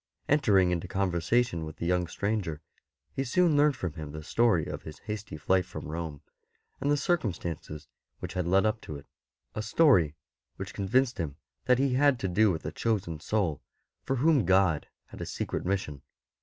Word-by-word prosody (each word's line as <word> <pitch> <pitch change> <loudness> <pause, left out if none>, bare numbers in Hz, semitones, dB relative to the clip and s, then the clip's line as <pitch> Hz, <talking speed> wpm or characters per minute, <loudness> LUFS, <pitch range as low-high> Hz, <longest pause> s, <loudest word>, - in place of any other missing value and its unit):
Entering 100 -11 +4
into 90 +1 -2
con 95 0 0
versation 85 +1 +1
with 80 -1 -7
the - - -5
young 90 0 +1
stranger, 100 -5 -2 0.5
he 135 - -1
soon 165 +5 +3
learnt 145 0 +4
from 90 -9 -4
him 75 -3 -7
the 75 0 -7
story 110 -3 +2
of - - -5
his 80 - -9
hasty 105 -5 -6
flight 95 +5 +2
from - - -8
Rome, 80 -2 -5 0.6
and 140 - -1
the 145 - +3
circumstances 90 - -2 0.3
which - - -6
had 90 -3 -1
led 95 +3 +4
up 110 +1 0
to 75 - -7
it 70 - -10 0.3
— - - -53
a 110 - -3
story 110 - +4 0.4
which - - -7
convinced 120 +5 +1
him 75 -5 -3 0.3
that 125 -1 +4
he 135 0 +2
had 140 0 +4
to 95 - 0
do 105 +4 +4
with 80 -1 -4
a - - -2
chosen 100 -8 -1
soul, 90 -5 -1 0.4
for 135 - -1
whom 145 +1 +3
God 95 -4 +3 0.2
had - - -11
a - - -3
secret - - -3
mission. 90 -8 -2
95 Hz, 190 wpm, -29 LUFS, 80-120 Hz, 0.6 s, Entering